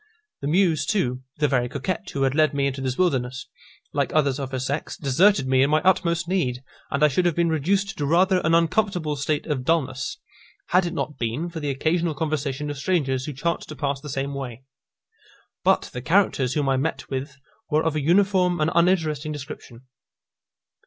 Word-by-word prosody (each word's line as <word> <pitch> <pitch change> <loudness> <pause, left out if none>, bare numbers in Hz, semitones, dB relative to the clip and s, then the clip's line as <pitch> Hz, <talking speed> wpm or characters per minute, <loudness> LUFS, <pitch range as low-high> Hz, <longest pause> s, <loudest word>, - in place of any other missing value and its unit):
The 140 - -3
Muse 160 -4 +2
too, 130 - 0 0.2
the 150 0 +2
very 125 -3 +1
coquette 185 - -3
who 140 - -2
had 135 -1 +2
led 155 0 +2
me 140 -1 +1
into 135 -1 -2
this 130 -1 -2
wilderness, 130 -7 0 0.5
like - - 0
others 140 -3 +2
of 135 -2 -4
her 130 - -2
sex, 135 +4 -3
deserted 165 +4 +3
me 130 0 +3
in 140 - +3
my 155 +1 +4
utmost 170 -2 +2
need, 135 -9 -1 0.3
and 140 +2 0
I - - +8
should 175 +5 +1
have 170 - 0
been 170 -1 +2
reduced 195 +7 0
to 145 - 0
rather 185 +4 +4
an 160 +1 +3
uncomfortable 170 -2 +1
state 145 +1 -1
of 145 -5 -2
dulness, 130 -4 -1 0.5
had 180 0 +3
it 170 - -4
not 150 - -4
been 120 +9 -2
for 165 - -5
the 145 -2 -3
occasional 160 +4 0
conversation 145 -1 -2
of 145 - -7
strangers 135 -6 0
who 150 - -5
chanced 170 +6 -2
to 155 - -7
pass 140 -1 -2
the 150 - -8
same 135 +1 -3
way. 130 -3 -6 1.0
But - - +2
the 125 - -5
characters 150 -6 +2
whom 145 -2 0
I 135 -1 +2
met 155 +5 -2
with 140 +1 -4 0.3
were 155 0 +2
of 160 -2 0
a 155 - 0
uniform 180 +2 +3
and 155 +1 +1
uninteresting 165 -4 +1
description. 140 -5 -8
150 Hz, 195 wpm, -24 LUFS, 135-170 Hz, 1.0 s, I